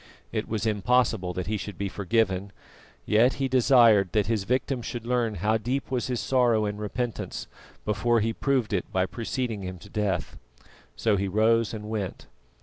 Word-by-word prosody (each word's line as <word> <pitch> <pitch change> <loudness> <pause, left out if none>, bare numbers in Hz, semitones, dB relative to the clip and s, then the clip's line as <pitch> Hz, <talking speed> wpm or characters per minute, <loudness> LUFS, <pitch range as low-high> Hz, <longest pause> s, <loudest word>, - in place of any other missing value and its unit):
It - - -2
was 110 0 -2
impossible 110 -2 +1
that 90 -1 -3
he 105 +2 -1
should 100 -1 -7
be 100 - -2
forgiven, 100 -1 0 0.5
yet 115 +5 +4
he 135 - -1
desired 120 -6 +5
that 105 -2 +2
his 110 -3 -1
victim 130 +2 0
should 115 0 -6
learn 120 -3 0
how 105 +5 +1
deep 130 +4 -3
was 125 -2 -1
his 125 -2 -1
sorrow 120 -1 +2
and 105 0 -3
repentance, 115 +2 -4 0.4
before 115 +3 +2
he 115 +1 0
proved 130 -4 0
it 95 - -2
by 95 0 +2
preceding 115 0 -3
him 90 -1 -6
to 100 - -14
death. 100 -5 -2 0.6
So 110 -3 +1
he 100 +1 -1
rose 110 +3 +2
and 105 -2 -6
went. 105 -4 -4
110 Hz, 175 wpm, -26 LUFS, 100-120 Hz, 0.6 s, desired